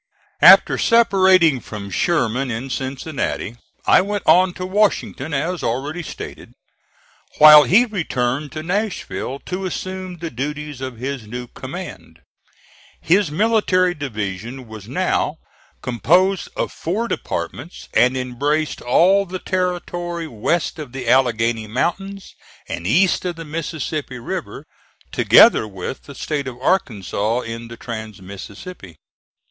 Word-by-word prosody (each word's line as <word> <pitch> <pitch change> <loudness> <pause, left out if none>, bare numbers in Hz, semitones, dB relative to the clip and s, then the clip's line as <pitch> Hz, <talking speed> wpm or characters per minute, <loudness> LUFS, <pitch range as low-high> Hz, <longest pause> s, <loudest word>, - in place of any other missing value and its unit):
After - - +8
separating 190 - +4
from 100 -4 -8
Sherman 135 - 0
in 120 +3 -4
Cincinnati 130 -3 -3 0.3
I - - +6
went 205 +1 -3
on 185 +1 +5
to 185 - -5
Washington, 185 -7 0
as 160 +5 -2
already 140 +9 -2
stated, - - -9 0.8
while 150 -1 +10
he 230 +7 +5
returned 145 - -2
to 155 0 -5
Nashville 180 - -3
to 185 +1 -3
assume 185 0 -5
the 165 0 -6
duties 145 +2 -5
of 130 -3 -5
his 130 -2 -5
new 125 +3 -6
command. - - -9 0.8
His 180 +1 +2
military 185 0 +2
division 120 - -5
was 110 -2 -10
now - - 0 0.5
composed 175 +10 +2
of - - -2
four 210 +8 -2
departments 170 - -5
and 125 +1 +3
embraced 145 +5 -1
all 190 +10 +3
the 185 +1 -4
territory 175 -2 -3
west 155 +6 -1
of 140 -5 -8
the 130 -3 -6
Alleghany 115 -3 +2
Mountains 195 - -3 0.3
and 85 - -5
east 180 - +3
of 180 -2 -3
the 165 0 -8
Mississippi 155 -3 -4
River, 120 - -6 0.5
together 110 - +6
with 95 +5 -7
the 140 - -11
State 140 0 -3
of 125 -1 -7
Arkansas 115 - 0
in 115 0 -7
the 115 0 -10
trans 110 -3 -7
Mississippi. 100 - -10
150 Hz, 125 wpm, -20 LUFS, 120-180 Hz, 0.8 s, while